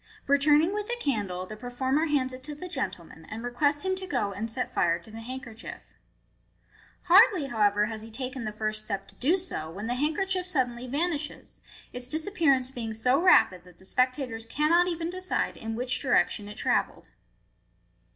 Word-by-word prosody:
Returning 295 +5 +4
with 420 0 -3
the 480 0 -1
candle, 200 - -2
the 215 - -8
performel 260 +6 -1
hands 265 -4 +1
it 255 0 -9
to 300 0 -4
the 365 +5 -7
gentleman, 170 - -5
and 220 +2 -6
requests 285 +5 +1
him 375 0 +1
to 375 0 -6
go 245 - 0
and 210 +4 -4
set 250 +3 -3
fire 170 -2 +2
to 180 +5 -15
the 225 - -8
handkerchief. 250 -1 -7 1.2
Hardly, 370 - +6
however, 210 -3 +3
has 220 0 -5
he 225 - -10
taken 255 +2 -5
the 215 - -3
first 215 0 -2
step 195 -2 -4
to - - -11
do 320 +9 +3
so, 340 - -5
when 195 +6 -6
the 240 - -1
handkerchief 360 +7 0
suddenly 255 -7 0
vanishes, 295 +2 -3 0.3
its 245 0 -3
disappearance 305 -4 +1
being 230 -4 -4
so 250 +6 +2
rapid 185 - +5
that 180 -1 -18
the 190 - -16
spectators 250 -1 -1
cannot 325 +7 +3
even 335 -1 -2
decide 370 0 -1
in 225 0 -5
which 250 +1 0
direction 245 -5 +2
it 210 - -9
travelled. - - 0
255 Hz, 180 wpm, -28 LUFS, 220-305 Hz, 1.2 s, Hardly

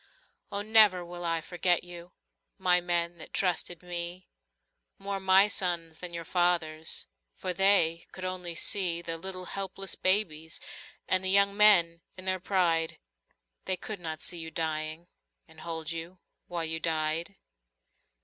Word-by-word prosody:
Oh, 200 0 -2
never 210 -5 +7
will 175 0 -8
I 165 -1 -1
forget 175 +1 0
you, 175 0 -12 0.4
My 180 -2 +3
men 170 -1 -1
that - - -9
trusted 180 -2 -1
me. 175 +1 -4 0.7
More 195 0 -3
my 190 +1 +5
sons 175 -5 -1
than 180 -1 -4
your 170 -1 -6
fathers'. 165 -3 0 0.3
For 185 - -4
they 175 -3 +3
could 185 - -8
only 180 -2 -3
see 170 -1 +1
The 165 - -3
little 185 +1 -6
helpless 195 0 -5
babies 160 -5 0 0.5
And 185 0 +3
the 190 - 0
young 200 +1 +5
men 175 -6 +5 0.2
in 185 - -6
their 185 0 0
pride. 170 -4 0 0.7
They 185 - +1
could 210 0 -7
not 160 -2 -6
see 175 - -2
you 160 0 -6
dying. 160 +1 -3 0.4
And 160 -1 -17
hold 160 -1 -5
you 165 +2 -6 0.3
while 170 -2 -3
you 160 0 -1
died. 160 +3 -1
175 Hz, 150 wpm, -28 LUFS, 165-185 Hz, 0.7 s, never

